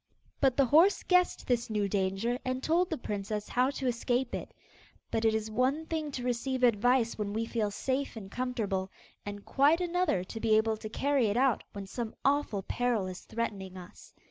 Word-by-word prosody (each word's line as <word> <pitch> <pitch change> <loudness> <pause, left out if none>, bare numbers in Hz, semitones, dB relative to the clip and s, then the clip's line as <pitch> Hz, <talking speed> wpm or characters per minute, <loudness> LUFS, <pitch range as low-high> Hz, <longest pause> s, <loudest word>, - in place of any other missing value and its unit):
But 265 -3 +3
the 275 - +5
horse 325 +10 +5
guessed 360 -1 +2
this 240 -2 0
new 210 -2 0
danger 195 +5 0
and 255 0 -2
told 345 +3 +2
the 320 - -2
princess 210 -1 -4
how 250 +2 +2
to 275 -1 -4
escape 245 +1 0
it. - - -5 0.6
But 225 0 0
it 220 0 +4
is 220 0 -2
one 260 +7 +1
thing 315 -2 -3
to 250 - -4
receive 250 +1 -1
advice 240 0 +3
when 205 -1 -2
we 225 +1 -1
feel 225 -2 -1
safe 265 +7 -2
and 195 -3 -8
comfortable, 210 -7 -2 0.4
and 205 0 -6
quite 290 +5 +4
another 355 - +1
to 225 +4 -7
be 220 -1 +3
able 220 0 +1
to 215 - -7
carry 275 +1 +1
it 205 +2 0
out 260 -1 +2
when 200 -1 -6
some 225 +3 -5
awful 275 -8 +1
peril 240 -2 0
is 185 -1 -6
threatening 195 -5 -4
us. 180 -1 -12
235 Hz, 195 wpm, -30 LUFS, 210-265 Hz, 0.6 s, the